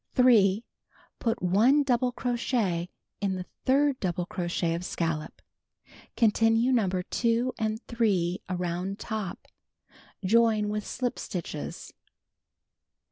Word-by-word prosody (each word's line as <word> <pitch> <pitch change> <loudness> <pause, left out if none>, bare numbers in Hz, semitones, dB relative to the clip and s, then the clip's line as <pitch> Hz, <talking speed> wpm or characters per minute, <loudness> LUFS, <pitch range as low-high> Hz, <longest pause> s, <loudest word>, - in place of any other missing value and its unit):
3. 220 -5 +5 0.6
Put 225 -5 -1
1 230 +11 +4
double 250 -2 +1
crochet 235 -8 -1 0.3
in 195 -2 0
the 180 -1 -5 0.2
third 275 0 +3
double 180 -2 -1
crochet 175 -2 -1
of 170 +1 -3
scallop. 165 -3 -3 0.7
Continue 225 +2 +3
No. 225 -7 +3
2 230 +7 0
and 220 0 -1
3 195 -7 0
around 180 +2 -2
top. 215 -6 -5 0.8
Join 220 0 +3
with 210 0 -3
slip 250 -1 -2
stitches. 165 -4 -6
210 Hz, 105 wpm, -28 LUFS, 180-240 Hz, 0.8 s, 3